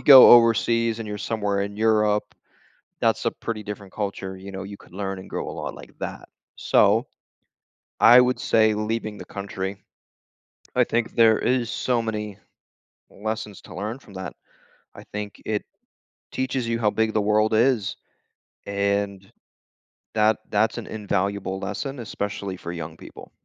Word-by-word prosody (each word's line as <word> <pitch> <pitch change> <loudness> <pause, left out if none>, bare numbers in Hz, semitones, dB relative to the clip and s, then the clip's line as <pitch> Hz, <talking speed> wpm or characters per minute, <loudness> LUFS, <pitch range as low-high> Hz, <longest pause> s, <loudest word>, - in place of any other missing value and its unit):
go 135 -3 +10
overseas 115 -1 +4
and 110 - -5
you're 105 0 -4
somewhere 100 -3 -1
in 100 +1 -5
Europe, 105 -1 +3 0.8
that's - - +2
a - - +4
pretty 110 -2 -5
different 105 -2 -8
culture, 100 -2 -4
you 95 +1 -9
know, 95 0 -5
you 100 +1 -8
could - - -19
learn 95 0 -4
and 95 - -10
grow - - -4
a - - -5
lot - - -5
like - - -12
that. - - -6 0.3
So, - - +3 0.9
I 120 +2 +9
would 125 0 +2
say 110 -1 +3
leaving 110 0 -2
the 90 - -8
country, 100 0 -5 1.0
I - - +5
think 115 0 -1
there 115 -1 +6
is 125 -2 +1
so 120 0 0
many 105 -3 -4 0.7
lessons 105 0 -5
to - - -12
learn 110 +7 -4
from 100 - -17
that. 95 -2 -6 0.6
I - - -10
think 105 0 -5
it 105 -1 -1 0.7
teaches 130 -2 -1
you 115 0 0
how 105 -2 +2
big 110 +1 0
the 110 - +2
world 105 +1 +2
is, 115 -2 +2 0.7
and 100 -1 -1 0.8
that 110 0 +3
that's 110 +3 +2
an 115 - -6
invaluable 100 -2 -2
lesson, 135 +7 -4
especially 100 -3 -4
for 85 -1 -7
young 80 -1 -6
people. - - -12
105 Hz, 155 wpm, -24 LUFS, 100-115 Hz, 1.0 s, go